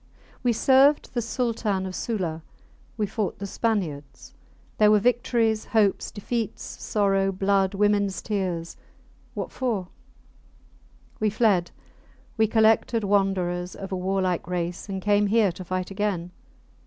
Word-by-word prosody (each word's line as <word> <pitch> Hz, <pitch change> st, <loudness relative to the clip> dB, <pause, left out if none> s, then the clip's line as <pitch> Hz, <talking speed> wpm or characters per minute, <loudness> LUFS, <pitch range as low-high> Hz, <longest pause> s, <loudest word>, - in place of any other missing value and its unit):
We 245 Hz, -, +2 dB
served 270 Hz, +5 st, +4 dB
the 240 Hz, -, 0 dB
Sultan 225 Hz, -4 st, -1 dB
of 185 Hz, -, -5 dB
Sula. 180 Hz, -8 st, -3 dB, 0.6 s
We 215 Hz, -, +1 dB
fought 205 Hz, 0 st, -3 dB
the 200 Hz, -, -5 dB
Spaniards. 160 Hz, -, -3 dB, 0.5 s
There 210 Hz, -1 st, +6 dB
were 210 Hz, -, +6 dB
victories, 230 Hz, -1 st, +1 dB
hopes, 210 Hz, -4 st, +1 dB
defeats, 220 Hz, +1 st, -4 dB, 0.2 s
sorrow, 195 Hz, -2 st, +1 dB
blood, 195 Hz, 0 st, +1 dB
womens 205 Hz, -1 st, +1 dB
tears... 185 Hz, -6 st, -3 dB, 0.6 s
What -, -, -4 dB
for?... 220 Hz, -8 st, -2 dB, 1.3 s
We 215 Hz, -, +2 dB
fled. 205 Hz, -5 st, +2 dB, 0.7 s
We 220 Hz, -1 st, +3 dB
collected 220 Hz, +1 st, +3 dB
wanderers 185 Hz, -3 st, 0 dB
of 195 Hz, 0 st, -8 dB
a -, -, -1 dB
warlike 185 Hz, -2 st, -1 dB
race 175 Hz, +2 st, -3 dB
and 190 Hz, -1 st, -4 dB
came 205 Hz, 0 st, +3 dB
here 210 Hz, -2 st, +3 dB
to 180 Hz, +2 st, -9 dB
fight 185 Hz, +1 st, -3 dB
again. 195 Hz, -4 st, -2 dB
200 Hz, 130 wpm, -25 LUFS, 185-220 Hz, 1.3 s, There